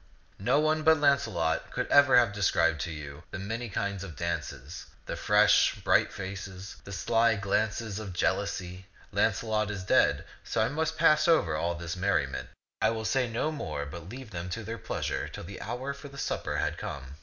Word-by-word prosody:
No 125 +9 +3
one 155 +1 +2
but 160 +1 +5
Launcelot 95 - +1
could - - -2
ever 145 -3 +7
have 120 -4 +4
described 85 -6 +2
to 85 - -3
you 75 -1 -8
the - - -6
many 110 +5 -4
kinds 100 -1 -2
of 90 -5 -8
dances, 70 +5 -4 0.2
the - - -4
fresh, - - +4
bright - - +2
faces, 95 0 -7
the 100 - -9
sly 115 +4 +2
glances 105 +1 -1
of 105 -3 -6
jeal 90 - +2
ousy. 90 +1 -5 0.3
Launcelot 110 -2 +1
is 100 -3 -4
dead, - - +3 0.2
so - - -2
I - - -1
must 160 +3 -1
pass 155 -1 +5
over 120 - +3
all 85 +2 -1
this 85 0 -5
merriment. 85 -8 0 0.3
I 110 - +4
will 110 -1 -3
say 130 -1 +1
no 120 +7 -1
more, 75 - -4
but 85 +4 -9
leave 125 0 -9
them 85 -1 -5
to 110 +5 -4
their 115 +2 -5
pleasure - - -3
till - - -8
the 95 +3 -8
hour 125 +5 -4
for 140 +1 -10
the 140 0 -12
supper - - -2
had - - -1
come. 70 0 -7
100 Hz, 190 wpm, -29 LUFS, 85-125 Hz, 0.3 s, ever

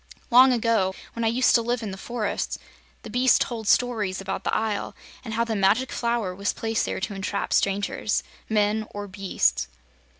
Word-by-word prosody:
"Long 255 +2 +8
ago, 225 -6 +1 0.2
when 230 - -3
I - - +2
used 245 +3 +3
to 235 - +5
live 240 +1 -2
in 210 - -4
the - - -5
forests, 225 +2 -3 0.5
the - - -8
beasts 250 +2 +4
told 225 -3 -3
stories 215 -7 +2
about 195 0 -4
the - - -1
Isle 215 -2 -2 0.3
and 220 -3 -5
how 230 - +2
the 230 -1 -2
Magic 205 +6 +2
Flower 235 -6 -1
was 200 +2 -1
placed 225 0 -1
there - - -3
to 200 +2 -3
entrap 200 +1 -3
strangers 200 +1 0 0.3
men 215 0 +1
or 205 0 -5
beasts." 65 - 0
220 Hz, 185 wpm, -25 LUFS, 195-235 Hz, 0.5 s, Long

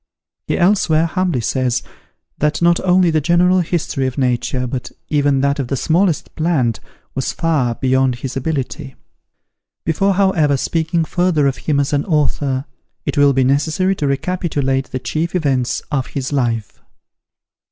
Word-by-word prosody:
He - - 0
elsewhere 175 -4 +3
humbly 175 -6 -1
says, 125 +1 0 0.6
that 150 0 +1
not 170 0 +3
only 180 -1 +3
the 155 -1 +1
general 175 +3 +3
history 160 -5 -1
of 130 - -5
Nature, 125 -1 0
but 125 0 -5 0.2
even 145 -2 +2
that 140 +1 +1
of 135 - -2
the 135 - -2
smallest 170 +4 +1
plant, 150 -9 0 0.3
was 135 - -2
far 150 -8 0
beyond 130 0 +1
his 130 +2 -6
ability. 135 0 -3 0.9
Before, 195 +5 +1
however, 175 -8 +2
speaking 165 +3 0
further 175 -4 +1
of 135 -2 +1
him 145 -2 +3
as 140 +1 0
an 145 0 +1
author, 145 -4 0 0.4
it - - -2
will 145 -1 +4
be 135 0 +2
necessary 155 +8 +1
to 145 - -1
recapitulate 140 -3 -1
the 130 - -3
chief 160 +7 -3
events 135 -7 0
of 135 -3 -1
his 135 +1 -4
life. 115 -6 -1
145 Hz, 150 wpm, -18 LUFS, 130-170 Hz, 0.9 s, will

